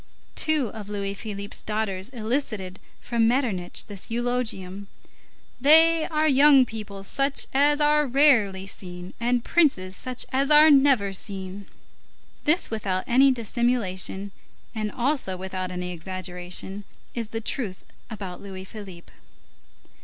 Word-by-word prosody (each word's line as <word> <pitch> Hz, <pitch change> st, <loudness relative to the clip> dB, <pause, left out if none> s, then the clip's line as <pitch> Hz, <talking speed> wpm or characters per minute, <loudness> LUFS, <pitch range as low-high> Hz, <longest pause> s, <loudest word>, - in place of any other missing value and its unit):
Two 305 Hz, -7 st, +1 dB
of 205 Hz, -1 st, -9 dB
Louis 200 Hz, -1 st, -3 dB
Philippe's 200 Hz, 0 st, -4 dB
daughters 210 Hz, -2 st, -3 dB
elicited 220 Hz, -6 st, -3 dB, 0.2 s
from 230 Hz, -2 st, +1 dB
Metternich 230 Hz, -8 st, -1 dB
this 200 Hz, -2 st, -8 dB
eulogium: 225 Hz, -5 st, -3 dB, 0.7 s
"They 320 Hz, +3 st, +6 dB
are 310 Hz, -2 st, +1 dB
young 275 Hz, -1 st, +6 dB
people 210 Hz, -4 st, -8 dB
such 275 Hz, +7 st, 0 dB
as 290 Hz, +2 st, +3 dB
are 300 Hz, 0 st, +3 dB
rarely 240 Hz, -9 st, +4 dB
seen, 180 Hz, -2 st, -9 dB
and 240 Hz, 0 st, 0 dB
princes 195 Hz, -, +2 dB
such 255 Hz, +4 st, -2 dB
as 270 Hz, +2 st, +1 dB
are 305 Hz, +1 st, +7 dB
never 270 Hz, -8 st, +4 dB
seen." 195 Hz, 0 st, -5 dB, 0.8 s
This, 310 Hz, -1 st, +3 dB
without 195 Hz, -4 st, -2 dB
any 265 Hz, +3 st, +5 dB
dissimulation, 215 Hz, -5 st, -1 dB, 0.4 s
and 215 Hz, -2 st, -3 dB
also 245 Hz, -7 st, -1 dB
without 185 Hz, 0 st, -5 dB
any 180 Hz, 0 st, -5 dB
exaggeration, 185 Hz, +2 st, -5 dB, 0.3 s
is 230 Hz, -2 st, -3 dB
the 225 Hz, +1 st, -4 dB
truth 215 Hz, -4 st, -4 dB, 0.2 s
about 195 Hz, -5 st, -7 dB
Louis 190 Hz, -1 st, -8 dB
Philippe. 190 Hz, -5 st, -11 dB
215 Hz, 125 wpm, -25 LUFS, 190-265 Hz, 0.8 s, are